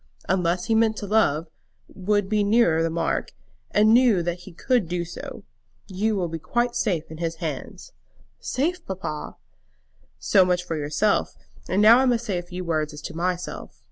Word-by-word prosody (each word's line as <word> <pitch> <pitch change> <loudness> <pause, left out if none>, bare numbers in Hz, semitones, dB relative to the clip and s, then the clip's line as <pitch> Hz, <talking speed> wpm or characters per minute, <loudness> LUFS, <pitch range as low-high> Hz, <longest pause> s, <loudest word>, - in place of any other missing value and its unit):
"Unless 180 -1 0
he 225 - +1
meant 220 -1 +3
to 205 - -5
love, 180 -7 +2 0.4
would 205 +1 -1
be 210 0 +1
nearer 200 -6 +3
the 165 - +1
mark; 165 +1 -2 0.4
and 215 +1 +4
knew 235 -7 +4
that 175 +1 -3
he 185 +2 -12
could 230 +3 0
do 175 0 -2
so. 170 - -9 0.4
You 210 +3 -1
will 180 -3 -1
be 165 0 -5
quite 240 +8 -1
safe 170 -8 -1
in 160 - -9
his 165 -1 -2
hands." 160 - -6 0.5
"Safe, 335 +6 -2
papa!" 185 -5 -5 0.8
"So 195 -2 +4
much 180 -1 +1
for 170 -2 -4
yourself; 150 +7 0 0.3
and 195 +3 +2
now 230 +3 +8
I 265 - +3
must 235 -1 +1
say 195 -6 -1
a - - -4
few 180 +1 -7
words 155 -2 -1
as 150 - -9
to - - -6
myself. 175 - -4
185 Hz, 180 wpm, -24 LUFS, 165-215 Hz, 0.8 s, now